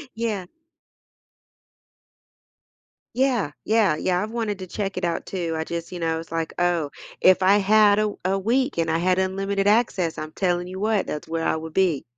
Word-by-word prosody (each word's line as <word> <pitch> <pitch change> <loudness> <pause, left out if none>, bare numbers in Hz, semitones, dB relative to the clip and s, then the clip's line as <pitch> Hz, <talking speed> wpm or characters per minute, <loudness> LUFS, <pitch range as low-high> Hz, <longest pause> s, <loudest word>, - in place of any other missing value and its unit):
Yeah. 220 -5 -2 2.7
Yeah, 250 - +1
yeah, 215 -7 +3
yeah, 180 +3 0
I've 220 - -5
wanted 225 -4 -2
to 185 - -7
check 195 +1 -4
it 185 - -1
out 170 - -2
too, 170 -4 -3
I 160 - -1
just 170 0 -5
you 180 - -6
know, 160 -1 -1
it's 165 0 -10
like, 165 -1 -2
oh, 175 -4 +1 0.3
if 185 0 +5
I 195 +2 +6
had 205 0 +5
a 210 -1 0
a 195 +1 +2
week 255 +4 0
and 165 0 +1
I 160 - +2
had 185 +1 +2
unlimited 195 +1 -1
access, 205 -6 +2
I'm 155 0 -6
telling 175 -1 -1
you 185 +1 -7
what, 215 -1 +1
that's 150 - -5
where 165 0 -2
I - - +1
would 160 0 -6
be. 180 -7 +2
185 Hz, 185 wpm, -24 LUFS, 165-205 Hz, 2.7 s, I